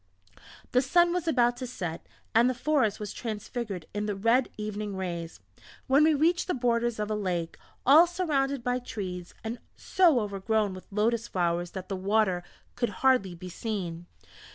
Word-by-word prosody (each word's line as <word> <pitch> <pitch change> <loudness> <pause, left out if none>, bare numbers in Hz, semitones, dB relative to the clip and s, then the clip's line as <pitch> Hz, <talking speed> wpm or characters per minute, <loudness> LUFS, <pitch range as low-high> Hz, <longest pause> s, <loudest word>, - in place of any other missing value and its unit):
The 250 - +4
sun 345 +6 +3
was 355 -2 -2
about 245 -5 +3
to 255 0 -5
set 175 -9 -5 0.3
and 235 +3 +5
the 255 - -1
forest 255 -6 +1
was 210 -1 -5
transfigured 215 -4 -5
in 210 +1 -2
the 205 - -1
red 230 +5 +2
evening 210 -1 -4
rays, 170 - -5 0.5
when 275 +3 +4
we 315 0 +5
reached 335 +4 +2
the 365 - 0
borders 240 -2 +1
of 210 0 -2
a - - +1
lake, 180 -5 -2 0.3
all 310 +6 +8
surrounded 280 -7 -1
by 250 +1 0
trees, 185 -7 -6
and 225 +2 -4 0.2
so 345 -9 +3
overgrown 205 0 0
with 185 - -10
lotus 225 +3 +1
flowers 175 -1 0
that 190 -1 -6
the 195 - -3
water 190 -1 +1 0.3
could 240 -2 0 0.2
hardly 200 -9 +3
be 180 +2 -9
seen. 175 -4 -4
220 Hz, 170 wpm, -28 LUFS, 190-255 Hz, 0.5 s, all